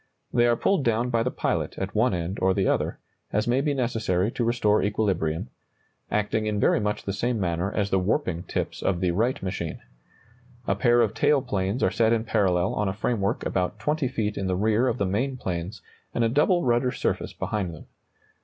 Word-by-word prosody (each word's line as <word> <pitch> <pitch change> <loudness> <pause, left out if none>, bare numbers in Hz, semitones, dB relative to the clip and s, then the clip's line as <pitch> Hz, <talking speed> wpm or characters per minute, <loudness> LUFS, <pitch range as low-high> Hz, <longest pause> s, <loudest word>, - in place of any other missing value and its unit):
They 120 0 +4
are 120 - +4
pulled 185 +5 +1
down 120 0 +1
by 115 -1 +2
the 120 - 0
pilot - - -2
at 95 +1 -3
one 110 +4 +3
end 90 +1 -3
or 95 0 +3
the 95 - +1
other, - - 0 0.3
as 105 +2 0
may 125 +3 +2
be 145 0 0
necessary 110 -6 0
to 120 - -2
restore 115 -3 +2
equilibrium, 95 -6 -1 0.6
acting 105 +1 0
in 105 -1 -1
very - - +3
much 105 0 -2
the 100 - -3
same 120 +3 -1
manner 90 +1 -1
as 100 -2 -1
the 95 - +3
warping 90 - 0
tips - - -3
of 90 -3 0
the 90 -1 +1
Wright 115 +8 0
machine. 90 -3 -4 0.9
A - - +2
pair 120 -2 +3
of 110 -2 +1
tail 145 +2 +3
planes 100 -1 -1
are - - +3
set 115 0 +3
in 115 -1 +1
parallel 95 -5 +1
on 105 - 0
a - - -2
framework 105 -1 -1
about 90 +2 -1
20 150 +3 0
feet 110 -5 -2
in 95 - -2
the 95 - 0
rear 110 +5 +2
of - - 0
the 100 - 0
main 125 +8 -1
planes, 90 -3 -4 0.3
and 120 - +2
a 115 - +3
double 155 +8 +3
rudder 120 +1 +2
surface - - -2
behind 100 -5 -2
them. 80 - -11
105 Hz, 210 wpm, -26 LUFS, 95-120 Hz, 0.9 s, They